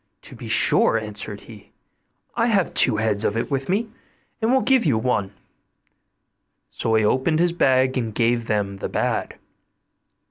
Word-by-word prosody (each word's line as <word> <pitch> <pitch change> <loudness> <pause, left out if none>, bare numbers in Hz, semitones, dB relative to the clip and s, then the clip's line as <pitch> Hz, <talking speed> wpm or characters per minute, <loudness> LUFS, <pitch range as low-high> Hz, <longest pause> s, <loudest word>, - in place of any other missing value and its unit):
'To - - -8
be - - -9
sure,' - - +4
answered - - -6
he; - - -15 0.7
'I 230 0 +1
have 200 -6 +1
two 115 -4 +3
heads 110 -1 -1
of 105 - -1
it 115 - -3
with 135 +1 -2
me, 210 +5 0 0.5
and 225 +2 +1
will 265 0 +3
give 260 -1 +3
you 140 -9 +1
one'; 110 -4 -1 1.4
so 110 - -1
he 110 -1 +2
opened 130 +8 +1
his 170 +1 +1
bag 130 -5 +2
and 110 -3 -5
gave 115 0 0
them 100 -2 -2
the - - -5
bad. - - -2
130 Hz, 165 wpm, -22 LUFS, 110-175 Hz, 1.4 s, sure